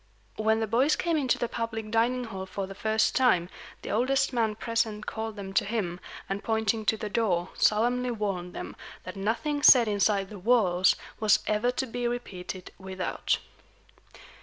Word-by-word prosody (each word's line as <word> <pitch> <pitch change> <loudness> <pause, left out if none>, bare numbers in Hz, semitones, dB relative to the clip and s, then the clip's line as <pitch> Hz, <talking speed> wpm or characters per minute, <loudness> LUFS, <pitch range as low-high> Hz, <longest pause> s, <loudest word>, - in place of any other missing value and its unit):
When 220 +1 +2
the - - +1
boys 255 +8 +2
came 335 -1 0
into 270 -5 +1
the 240 - -1
public 225 -2 -4
dining 240 +3 +2
hall 190 -5 -6
for 195 +1 -4
the 195 - -8
first 220 +2 +1
time, 205 -10 +3 0.3
the - - -4
oldest 255 +5 +1
man 225 -3 +1
present 220 -1 -1
called 220 -1 -4
them 195 -2 -7
to - - +3
him, 200 -5 -3 0.3
and, 195 +1 -4
pointing 220 -1 0
to 220 - +2
the 215 - -4
door, 195 -5 0
solemnly 245 +4 +2
warned 195 -6 -3
them - - -6 0.3
that - - -8
nothing 235 +9 -1
said 250 -5 +8
inside 200 -1 +1
the 205 - -8
walls 185 -4 +3 0.2
was 215 -1 +3
ever 215 +3 +1
to 265 - -1
be 245 0 -3
repeated 190 -6 -6
without. 190 -1 -2
220 Hz, 170 wpm, -28 LUFS, 195-240 Hz, 0.3 s, said